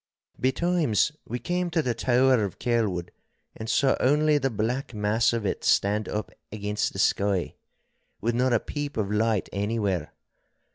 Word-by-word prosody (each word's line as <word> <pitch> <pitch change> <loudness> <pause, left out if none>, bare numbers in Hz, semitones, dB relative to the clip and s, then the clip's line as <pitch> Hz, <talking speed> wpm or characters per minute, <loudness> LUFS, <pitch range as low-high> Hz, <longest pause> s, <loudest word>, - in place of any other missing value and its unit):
Betimes 150 - +1 0.2
we 120 - -3
came 175 +8 -2
to 165 -2 0
the 125 - 0
tower 125 0 +3
of 100 -2 -4
Kelwood 105 -8 -1 0.4
and 110 0 -6
saw 135 +3 +3
only 150 +2 +3
the 135 -1 0
black 120 +3 -2
mass 105 +2 +2
of 115 -3 -2
it - - -2
stand 105 +2 +2
up 105 0 -3 0.2
against 105 0 -2
the - - -8
sky, 100 -1 +1 0.7
with 120 +3 0
not 125 +2 +2
a 120 - +4
peep 145 +2 -5
of 105 -2 -1
light 110 -1 +1
anywhere. 100 -5 -1
115 Hz, 155 wpm, -26 LUFS, 105-130 Hz, 0.7 s, a